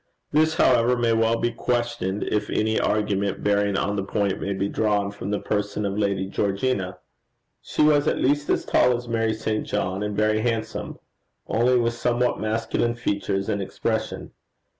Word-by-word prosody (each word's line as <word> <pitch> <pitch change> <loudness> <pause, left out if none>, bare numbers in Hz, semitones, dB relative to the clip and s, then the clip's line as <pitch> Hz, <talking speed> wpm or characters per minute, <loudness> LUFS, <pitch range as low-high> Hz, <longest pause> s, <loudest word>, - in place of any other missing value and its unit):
This, 155 +1 +3
however, 125 0 +4
may 120 -1 +2
well 115 0 +2
be 120 +1 0
questioned 120 -5 -1
if 105 -1 -1
any 110 +1 +1
argument 100 -2 0
bearing 100 -1 +2
on 100 - 0
the 100 - -1
point 100 -1 -1
may 100 - -2
be 100 +1 -1
drawn 105 -1 0
from 100 -1 -6
the 105 - 0
person 105 0 -2
of 100 0 -2
Lady 100 -2 0
Georgina. 100 0 -1 0.6
She - - 0
was 150 -1 +4
at - - +2
least 145 +2 +1
as - - +1
tall 125 -1 +3
as 120 0 -9
Mary 115 -1 0
St. 110 -1 -2
John, 95 +2 -2
and 105 -1 -3
very 110 0 +2
handsome 115 -1 -3 0.5
only 125 +2 +2
with 120 -1 +1
somewhat 120 +1 0
masculine 115 +2 -1
features 100 -3 -2
and 100 -2 -1
expression. 95 - -3
110 Hz, 170 wpm, -24 LUFS, 100-120 Hz, 0.6 s, however